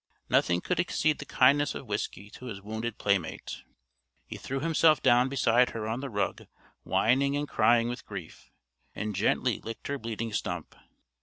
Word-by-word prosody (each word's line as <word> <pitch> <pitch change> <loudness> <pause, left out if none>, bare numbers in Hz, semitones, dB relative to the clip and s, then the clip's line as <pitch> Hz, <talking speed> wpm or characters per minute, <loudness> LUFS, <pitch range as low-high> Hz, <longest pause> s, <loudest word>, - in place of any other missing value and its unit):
Nothing 85 0 +3
could 180 -2 -1
exceed 155 -3 +1
the 140 - -6
kindness 145 +3 +3
of - - -6
Whiskey 100 +4 -4
to 125 - -11
his 110 -6 -6
wounded 110 +3 -5
playmate. 100 -5 -1 0.6
He - - -8
threw 135 +1 -4
himself 160 -1 +4
down 125 +2 +5
beside 125 -2 +3
her 110 -1 -4
on 115 +3 -2
the 140 0 -5
rug 100 -3 -2 0.3
whining 140 +4 +2
and 145 0 -2
crying 115 0 +3
with 120 +1 -6
grief, - - -9 0.5
and 105 -1 -3
gently 115 +4 +1
licked 115 +3 -7
her 140 0 -2
bleeding 115 0 -4
stump. - - -4
120 Hz, 165 wpm, -29 LUFS, 110-140 Hz, 0.6 s, down